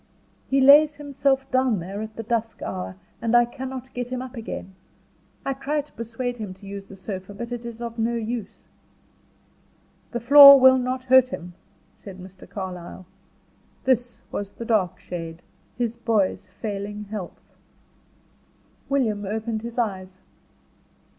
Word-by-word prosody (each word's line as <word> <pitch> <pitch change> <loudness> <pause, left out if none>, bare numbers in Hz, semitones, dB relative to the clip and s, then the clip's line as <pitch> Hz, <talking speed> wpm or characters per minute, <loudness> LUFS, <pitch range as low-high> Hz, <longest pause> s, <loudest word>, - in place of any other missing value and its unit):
"He 270 0 +3
lays 290 +3 +7
himself 275 -2 0
down 255 -4 +2
there 190 +4 -5
at 220 0 -7
the 225 - -5
dusk 225 0 -2
hour, 95 0 -5 0.3
and 230 +1 +1
I 240 - +5
cannot 260 +1 -7
get 245 0 -4
him 255 0 -3
up 255 0 -7
again. 220 -4 -6 0.7
I 275 - 0
try 290 +3 -2
to 285 - -22
persuade 240 +2 -4
him 205 -5 -6
to 190 - -16
use 195 0 -8
the 195 - -11
sofa, 190 0 -7
but 235 +3 -6
it 240 -1 -5
is 235 0 -7
of 230 0 -6
no 230 +1 +1
use." 230 -1 -5 1.4
"The 240 - -3
floor 280 +3 +10
will 260 0 +7
not 255 +1 -2
hurt 260 0 +6
him," 175 -7 -7 0.4
said 195 -2 -11
Mr. 185 0 -13
Carlyle. 185 -2 -7 0.8
This 245 -2 0
was 200 -1 -5
the 230 - -7
dark 210 -6 +1
shade: 165 -1 -7 0.3
his 235 -2 -1
boy's 220 -6 0
failing 205 +2 -5
health. 205 -5 -8 1.4
William 225 -7 0
opened 220 +2 -3
his 235 +1 -8
eyes. 190 -5 -2
230 Hz, 150 wpm, -24 LUFS, 200-255 Hz, 1.4 s, floor